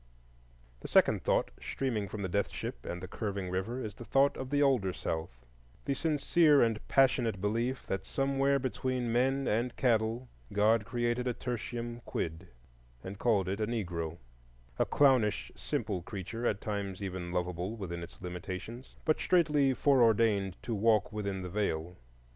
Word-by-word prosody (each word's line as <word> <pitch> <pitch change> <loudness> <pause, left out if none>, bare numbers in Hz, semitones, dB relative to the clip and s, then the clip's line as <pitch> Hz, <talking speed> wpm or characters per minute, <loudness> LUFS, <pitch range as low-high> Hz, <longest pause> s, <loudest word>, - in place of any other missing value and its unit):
The - - -7
second - - +4
thought - - +1
streaming 115 -7 -2
from 105 0 -5
the - - 0
death 100 +3 0
ship - - -6
and 90 +1 -5
the - - -4
curving 100 -2 -4
river 100 +7 -2
is 110 -5 -4
the 120 - -10
thought 135 +4 +3
of 130 - -5
the 145 +1 +3
older 120 -10 +2
South,—the - - -6
sincere 150 0 +4
and 115 -2 +1
passionate 120 -6 +3
belief 115 +6 -1
that 95 0 -2
somewhere 135 +4 +1
between 130 -2 -2
men 135 +3 +2
and 115 +3 0
cattle, 115 0 +1 0.2
God 105 +2 +3
created 120 +1 -1
a 125 - -1
tertium 120 -1 -4
quid, 80 +2 -4 0.6
and 95 +1 -7
called 105 -6 +2
it 100 +2 -2
a 105 - +1
Negro,—a 80 - -5
clownish, 130 -8 +3
simple 95 -4 -2
creature, 105 +5 -4
at 105 - -1
times 100 -2 -3
even 90 -2 -4
lovable 90 +3 -2
within 85 -5 -5
its 85 - -10
limitations, 95 +7 -7
but 155 - +2
straitly 150 -6 +3
foreordained 115 -8 +3
to 120 - -3
walk 105 0 +2
within 100 -3 -3
the 90 - -5
Veil. 90 -4 -1
105 Hz, 155 wpm, -31 LUFS, 95-125 Hz, 0.6 s, second